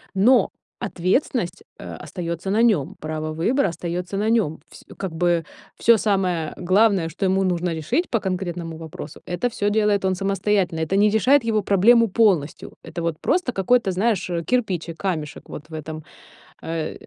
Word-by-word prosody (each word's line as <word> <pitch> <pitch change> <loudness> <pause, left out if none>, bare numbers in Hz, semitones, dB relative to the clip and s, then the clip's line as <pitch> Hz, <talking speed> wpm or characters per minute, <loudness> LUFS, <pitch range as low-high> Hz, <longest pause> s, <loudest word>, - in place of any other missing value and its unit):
но 225 +2 +4 0.3
ответственность, 190 - -1 0.2
э, - - -7
остаётся 170 +1 -5
на 215 +3 +3
нём, 195 - +2
право 155 0 -4
выбора 195 - +1
остаётся 175 +3 -4
на 210 +2 0
нём. 215 -9 +1
Вс - - -14
как 190 -3 -4
бы, 170 -1 +1 0.3
всё 235 0 +5
самое 185 -6 0
главное, 190 -1 +3
что 170 +5 -3
ему 190 +1 +2
нужно 180 -2 0
решить 235 - -1
по 230 - +1
конкретному 175 -4 -4
вопросу,- 160 -1 -9
это 175 +7 -1
всё 205 -3 -1
делает 210 -2 +2
он 190 - +2
самостоятельно, 195 -3 0
это 175 +4 -1
не 210 +1 +5
решает 250 +6 +4
его 215 -2 +1
проблему 230 +5 +5
полностью. 185 -8 +1
Это 170 - -6
вот 165 -2 -2
просто 350 -9 0
какой-то, 210 +1 +2
знаешь, 195 0 0
э, 170 -1 -2
кирпичик, 185 -9 -1
камешек 160 -7 -4
вот 155 +2 -9
в - - -13
этом, 155 0 -6 0.6
э, 160 -1 -3
185 Hz, 165 wpm, -22 LUFS, 165-210 Hz, 0.6 s, всё